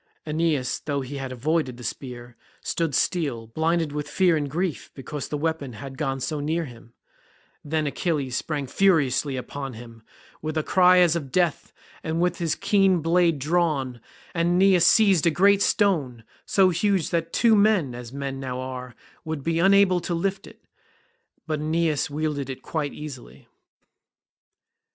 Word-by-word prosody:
Aeneas 155 -4 0
though 145 -2 -2
he 135 +2 -6
had 135 -1 -5
avoided 130 0 -1
the 125 - -10
spear, 120 0 -7 0.3
stood 165 -4 -2
still, 140 -11 0
blinded 160 +6 0
with 150 0 -4
fear 180 -3 +3
and 145 -2 -2
grief 170 +2 -3
because 140 +1 -6
the 150 - -3
weapon 150 -4 -2
had 135 +5 -8
gone 135 -2 -2
so 150 +3 -3
near 160 +3 -1
him; 120 -2 -14 0.7
then 155 +1 -1
Achilles 145 -4 -2
sprang 145 -2 -2
furiously 145 -5 +2
upon 135 +1 -6
him, 115 0 -12 0.4
with 155 0 -3
a 155 - +1
cry 180 +1 +5
as 175 -2 +5
of 140 -6 -4
death 175 -4 0 0.3
and 160 +1 -2
with 180 +1 0
his 165 -2 0
keen 195 -4 +2
blade 170 -1 +3
drawn, 140 -5 0 0.3
and 170 0 +1
Aeneas 185 -1 +5
seized 195 -7 +5
a - - +6
great 200 +4 +4
stone, 150 - +1 0.2
so 190 -2 +4
huge 190 -1 0
that 165 -1 -1
two 230 -2 +4
men, 200 - +3
as 120 -1 -8
men 135 -1 -5
now 130 -1 -4
are, 125 -1 -6 0.3
would 160 -4 -5
be 165 +1 0
unable 195 0 +5
to 175 0 -3
lift 195 +3 -2
it, - - -16 0.8
but 155 -2 -2
Aeneas 155 -1 0
wielded 145 -2 -3
it 130 - -7
quite 150 -3 -3
easily. 130 - -10
155 Hz, 160 wpm, -24 LUFS, 135-175 Hz, 0.8 s, a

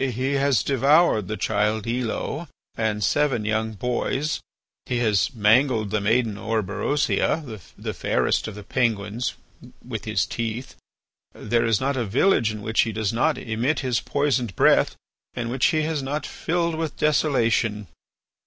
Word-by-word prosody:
He 130 +1 -1
has 140 -5 +2
devoured 140 - +3
the 110 - -3
child 105 0 0
Elo 125 +7 -3 0.3
and 105 -2 -1
seven 135 -1 +1
young 110 +1 -1
boys; 125 +7 -1 0.5
he 125 - -1
has 110 -5 +2
mangled 110 0 +3
the 105 -1 0
maiden 110 0 +1
Orberosia, 110 - 0 0.3
the - - -4
fairest - - 0
of 110 - -7
the 105 - -9
Penguins, 110 0 -1 0.5
with - - -5
his - - +1
teeth. 115 +3 -4 0.6
There 115 +2 0
is 115 -2 +2
not 135 +1 -1
a 120 - 0
village 115 - +3
in 105 -1 -7
which 110 +1 +2
he 115 - 0
does 110 0 -2
not 115 - +1
emit 120 +7 -1
his 125 -4 0
poisoned 130 - 0
breath - - +4 0.4
and 120 -1 -3
which 130 +1 +2
he 155 -1 +1
has 155 -2 -1
not 145 +2 -3
filled 170 0 -1
with 160 -2 -3
desolation. 115 -8 +1
120 Hz, 150 wpm, -24 LUFS, 110-140 Hz, 0.6 s, breath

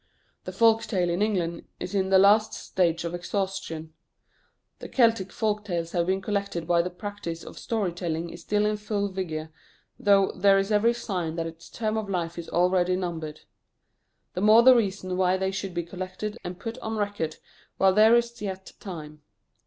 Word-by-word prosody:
The - - -4
folk 225 -1 +4
tale 180 -5 0
in 175 +3 -1
England 180 -6 -1
is - - -5
in 190 -1 +1
the 190 - +6
last 205 +3 +5
stages 170 -2 0
of 170 - -3
exhaustion. 175 -3 -4 0.9
The - - -8
Celtic 225 -7 +2
folk 210 0 -1
tales 170 -4 -3
have 170 -1 0
been 190 +1 0
collected 200 -5 -2
while 170 -1 +4
the 180 - -3
practice 180 -3 -6
of - - -10
story 215 -6 -1
telling 170 -1 -3
is 170 - -10
still 210 0 +1
in 210 0 +1
full 205 -1 -2
vigour, 160 -4 -4 0.5
though 200 -1 +4
there 195 +1 +4
is 195 +2 0
every 225 +3 +3
sign 180 -8 -3
that 165 -1 -2
its 165 0 -9
term 220 -1 -2
of 215 -2 -3
life 175 -2 -2
is 170 - -7
already 180 +1 +2
numbered. 165 -4 -4 0.9
The 180 - -3
more 215 +3 +7
the 260 +1 +8
reason 190 -5 -1
why 185 0 +3
they 190 0 -1
should 195 -2 -5
be 175 - -1
collected 185 +4 -5
and 180 0 -6
put 230 +1 -6
on 220 -2 -4
record 205 -7 -2 0.4
while 190 -1 +4
there 215 +3 +6
is 235 -1 0
yet 190 -2 -5
time. 155 -5 -8
190 Hz, 185 wpm, -26 LUFS, 175-210 Hz, 0.9 s, the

